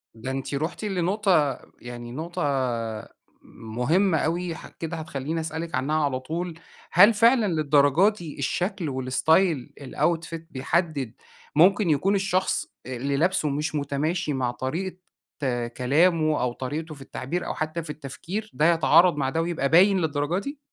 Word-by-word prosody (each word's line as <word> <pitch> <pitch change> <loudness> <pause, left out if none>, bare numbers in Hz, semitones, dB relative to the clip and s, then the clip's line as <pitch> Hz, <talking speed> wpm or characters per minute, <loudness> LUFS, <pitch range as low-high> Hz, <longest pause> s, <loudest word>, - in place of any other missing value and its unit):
ده 115 +4 -5
أنتِ 135 +1 -4
رُحتِ 155 +9 -3
لنقطة، 185 -6 +1 0.2
يعني 120 -1 -8
نقطة 160 +7 -4 1.0
مُهمة 155 - 0
أوي. 170 +2 -1
ح - - -10
كده 165 0 -6
هتخلّيني 155 0 -4
أسألِك 160 +1 -4
عنها 150 +4 0
على 130 -2 -1
طول. 165 +6 -4 0.4
هل 210 +3 +7
فعلًا 230 +2 +4
للدرجة 155 +2 +4
دي 175 -10 -9
الشكل 175 +4 -1
والستايل 135 +3 +1
الoutfit 165 +4 -1
بيحدد، 140 -2 -1 0.4
مُمكن 185 +4 +5
يكون 185 +7 +2
الشخص 190 -1 0 0.2
اللي 130 +3 -2
لابسُه 165 -1 +1
مش 150 +2 -2
متماشي 150 +3 -1
مع 130 -2 -1
طريقة 170 +10 -4 0.8
كلامه، 155 +4 +3
أو 125 -1 0
طريقته 150 +5 -5
في 140 - -15
التعبير، 135 +6 -4
أو - - -3
حتى 155 +2 -3
في 150 - -11
التفكير، 165 +9 -6
ده 165 +3 +4
يتعارض 170 +1 +5
مع 135 -2 0
ده 160 +4 0
ويبقى 165 -5 -1
باين 190 +5 +5
للدرجة 150 +2 0
دي؟ 280 +8 -6
160 Hz, 140 wpm, -25 LUFS, 140-180 Hz, 1.0 s, هل